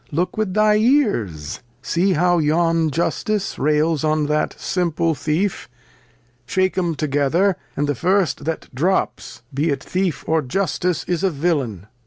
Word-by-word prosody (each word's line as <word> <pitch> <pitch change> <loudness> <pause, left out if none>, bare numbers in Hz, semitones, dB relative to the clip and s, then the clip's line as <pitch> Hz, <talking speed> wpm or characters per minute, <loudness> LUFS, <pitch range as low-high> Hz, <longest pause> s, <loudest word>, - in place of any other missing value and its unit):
Look 175 +4 -1
with 215 -3 -2
thy 215 0 +4
Ears; 200 - +1 0.2
see 185 +6 +1
how 175 +1 +3
yon 165 +1 +2
Justice 200 +6 -1
rails 150 +1 +1
on 155 -1 +1
that 150 +1 -1
simple 170 -3 0
Thief; 160 +5 -2 0.8
shake 185 +5 +1
'em 175 -3 0
together, 150 +7 +1 0.2
and 145 - +1
the 145 - 0
first 185 - +1
that 160 -2 -4
Drops, 170 -3 -1
be 145 +5 0
it 140 - -1
Thieif, 185 -2 -2
or 160 0 +2
Justice, 175 +3 -1
is 175 +1 -2
a 190 - +4
Villain. 140 - -1
165 Hz, 145 wpm, -21 LUFS, 150-185 Hz, 0.8 s, thy